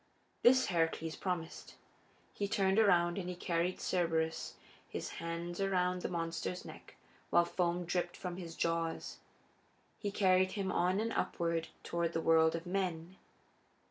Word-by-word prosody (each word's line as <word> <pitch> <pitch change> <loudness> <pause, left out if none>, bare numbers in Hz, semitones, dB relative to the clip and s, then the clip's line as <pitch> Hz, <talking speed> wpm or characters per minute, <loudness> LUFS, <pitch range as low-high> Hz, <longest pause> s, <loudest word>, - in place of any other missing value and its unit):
This 260 +2 +6
Heracles 165 -2 0
promised. 180 -3 -4 0.6
He 200 - -2
turned 195 0 +2
around 175 -4 +4
and 180 -1 -4
he 180 - -4
carried 175 0 0
Cerberus, 165 -3 -1 0.3
his - - -4
hands 170 +2 -4
around 180 -2 +1
the - - -2
monster's 170 +1 -3
neck - - -11 0.3
while 175 0 +5
foam 175 0 0
dripped 175 0 -1
from 180 -1 -5
his 170 -3 -7
jaws. 165 -1 -1 0.8
He 205 - -2
carried 185 -2 +3
him 195 -2 -1
on 180 +3 +2
and 225 +1 -1
upward 165 -1 -1 0.2
toward 170 -1 -1
the - - 0
world 160 0 +4
of 165 +1 -5
men. 180 -1 -2
175 Hz, 140 wpm, -34 LUFS, 165-185 Hz, 0.8 s, This